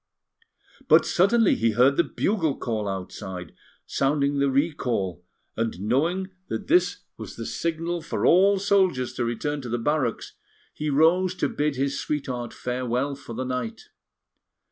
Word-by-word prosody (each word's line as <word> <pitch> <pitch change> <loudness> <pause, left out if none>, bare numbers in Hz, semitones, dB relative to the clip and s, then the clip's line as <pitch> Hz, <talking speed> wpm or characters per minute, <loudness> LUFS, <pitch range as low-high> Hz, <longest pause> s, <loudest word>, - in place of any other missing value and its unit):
But - - +6
suddenly 200 +4 +3
he 115 -1 +1
heard 125 +5 +4
the 170 - +4
bugle 165 -9 -1
call 110 -3 -2
outside, 95 -2 -6 0.3
sounding 140 0 +1
the 140 0 +3
recall; 125 - -1 0.3
and 115 -5 -2
knowing 165 - 0 0.2
that 205 - -4
this 355 - +2
was - - -8
the - - -6
signal 170 +1 -2
for 155 - -2
all 195 +3 +5
soldiers 190 -10 +2
to 125 - -2
return 145 +5 -2
to 125 - -7
the 120 - 0
barracks, 130 -1 -1 0.4
he 150 0 -3
rose 170 +6 +3
to - - 0
bid 150 -1 -1
his 140 +1 -1
sweetheart 130 -5 -3
farewell 125 +2 -2
for 135 -4 -9
the 130 +2 -3
night. 125 -3 -4
140 Hz, 145 wpm, -25 LUFS, 120-170 Hz, 0.4 s, But